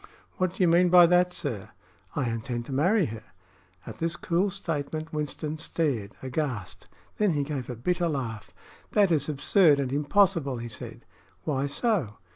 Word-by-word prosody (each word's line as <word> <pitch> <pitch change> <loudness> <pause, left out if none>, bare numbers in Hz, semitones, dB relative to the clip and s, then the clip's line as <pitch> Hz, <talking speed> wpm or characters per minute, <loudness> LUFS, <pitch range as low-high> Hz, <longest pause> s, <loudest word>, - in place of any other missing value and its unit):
"What 185 -1 0
do - - +1
you - - +5
mean 175 +2 +5
by 175 0 +8
that, 180 +1 +4
sir?" 140 - -5 0.5
"I 135 -4 0
intend 115 +1 -3
to - - -8
marry 180 +8 +3
her." 110 -2 -6 0.6
At - - -9
this 165 +1 -1
cool 180 +4 0
statement 160 -4 -4
Winston 150 +1 -3
stared 140 -11 -2
aghast. 130 - -4 0.3
Then 210 -5 +2
he 145 -1 0
gave 140 -3 -4
a 125 - -4
bitter 175 +8 0
laugh. 120 -8 -4 0.4
"That 200 -3 +4
is 150 -2 +1
absurd 150 +1 +4
and 135 -1 -1
impossible," 150 -2 +2
he 120 0 -6
said. 110 - -8 0.4
"Why 140 -2 -1
so?" 155 - 0
150 Hz, 165 wpm, -27 LUFS, 130-175 Hz, 0.6 s, by